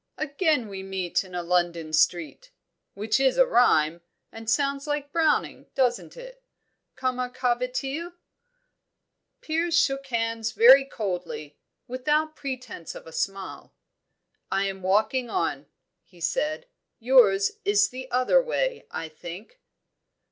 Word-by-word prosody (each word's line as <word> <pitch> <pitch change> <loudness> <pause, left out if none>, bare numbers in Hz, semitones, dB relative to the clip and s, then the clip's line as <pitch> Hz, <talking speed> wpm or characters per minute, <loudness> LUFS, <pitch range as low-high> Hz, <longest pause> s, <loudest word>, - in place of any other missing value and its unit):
Again 300 - 0
we 195 -2 -7
meet 190 -2 -2
in 185 -2 -11
a 175 - -2
London 170 -2 0
street 175 - +1 0.5
which 215 +5 0
is 270 -1 +2
rhyme, 175 - +4 0.3
and 225 0 -7
sounds 275 +4 0
like 290 -1 -2
Browning, 320 -2 +1
doesn't 250 - 0
it? - - -11 0.5
Comment 255 -1 -2
ca 250 -1 +2
va 250 +1 -3
t 270 +3 -3
il?" 345 +1 -8 1.3
Piers 330 +1 0
shook 275 -3 +1
hands 230 -2 -2
very 265 +4 +8
coldly, 180 - -5 0.3
without 300 +5 0
pretence 255 - -6
of - - -10
a 165 - -11
smile. 195 +3 -5 0.8
"I 195 +1 +1
am 195 -1 -4
walking 215 +6 +1
on," 375 - -2 0.4
he - - -21
said. 310 -2 -1 0.3
"Yours 225 -6 +4
is 410 +1 +3
the 260 +1 -8
other 255 - +3
way, - - -2
I 165 - -5
think." 175 - -10
250 Hz, 130 wpm, -26 LUFS, 195-295 Hz, 1.3 s, very